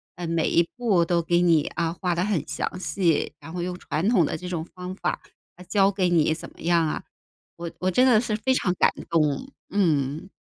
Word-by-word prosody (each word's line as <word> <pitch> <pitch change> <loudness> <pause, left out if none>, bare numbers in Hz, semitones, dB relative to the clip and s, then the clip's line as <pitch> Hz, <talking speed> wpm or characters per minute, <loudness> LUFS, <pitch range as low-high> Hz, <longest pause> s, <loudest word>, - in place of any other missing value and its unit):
嗯， 175 -1 -5
每 165 -1 +1
一 170 0 +3
步 205 -8 +3
都 170 0 +1
给 175 +1 +2
你 165 -4 +4
啊， 165 0 0
画 180 -2 +1
得 175 - 0
很 200 -6 0
详 150 +5 -3
细， 170 -1 0
然 160 - -10
后 175 0 -4
用 180 0 -3
传 165 +2 -2
统 200 -8 +4
的 155 - -3
这 180 - -8
种 170 -3 -3
方 180 0 -7
法， - - -2 0.4
来 180 - -12
教 195 0 +3
给 190 -2 +1
你 160 -2 +3
怎 160 - -8
么 - - -18
样 170 -1 +2
啊。 - - -3 0.5
我 170 0 -5
我 185 +1 0
真 255 +7 +4
的 225 -4 +5
是 215 -3 -2
非 260 +4 +1
常 200 -8 +1
感 - - +6 0.2
动， 165 - 0 0.2
嗯。 155 -3 0
175 Hz, 235 characters per minute, -25 LUFS, 165-190 Hz, 0.5 s, 感